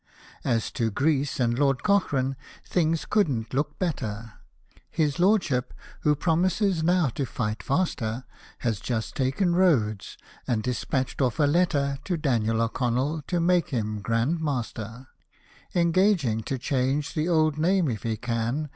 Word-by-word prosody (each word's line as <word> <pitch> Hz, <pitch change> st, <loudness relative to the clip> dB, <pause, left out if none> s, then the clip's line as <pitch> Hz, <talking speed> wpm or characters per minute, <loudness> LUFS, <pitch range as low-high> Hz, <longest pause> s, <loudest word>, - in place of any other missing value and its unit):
As 115 Hz, -4 st, 0 dB
to 115 Hz, -2 st, 0 dB
Greece 140 Hz, +5 st, 0 dB
and 120 Hz, 0 st, +1 dB
Lord 135 Hz, -3 st, +2 dB
Cochrane, 140 Hz, -10 st, +1 dB, 0.3 s
things 165 Hz, -2 st, 0 dB
couldn't 130 Hz, -, 0 dB
look 150 Hz, +2 st, -1 dB
better 115 Hz, -, -3 dB, 0.3 s
— -, -, -37 dB, 0.3 s
His 150 Hz, -3 st, 0 dB
Lordship 180 Hz, -, +2 dB, 0.2 s
(who 150 Hz, 0 st, +2 dB
promises 180 Hz, +3 st, +1 dB
now 175 Hz, -2 st, +3 dB
to 140 Hz, -, -3 dB
fight 110 Hz, -4 st, -3 dB
faster) 130 Hz, -, -1 dB, 0.4 s
Has 115 Hz, -5 st, -1 dB
just 110 Hz, 0 st, -3 dB
taken 140 Hz, +7 st, +1 dB
Rhodes, 120 Hz, -, +1 dB, 0.3 s
and 110 Hz, -3 st, 0 dB
dispatched 130 Hz, +2 st, -2 dB
off 125 Hz, -4 st, +1 dB
a -, -, +4 dB
letter 145 Hz, -3 st, +2 dB
To 180 Hz, -3 st, -1 dB
Daniel 115 Hz, -6 st, +1 dB
O'Connell, 130 Hz, +6 st, -1 dB
to 175 Hz, -, 0 dB
make 175 Hz, 0 st, +2 dB
him 110 Hz, -5 st, -2 dB
Grand 115 Hz, +10 st, 0 dB
Master; 125 Hz, -4 st, -4 dB, 0.7 s
Engaging 170 Hz, -, +2 dB
to 135 Hz, -, -2 dB
change 135 Hz, +2 st, -1 dB
the 155 Hz, +3 st, -1 dB
old 155 Hz, -3 st, +2 dB
name, 180 Hz, +1 st, +3 dB
if 110 Hz, -6 st, -2 dB
he 115 Hz, -1 st, -2 dB
can. 120 Hz, +6 st, -2 dB
135 Hz, 145 wpm, -26 LUFS, 115-165 Hz, 0.7 s, a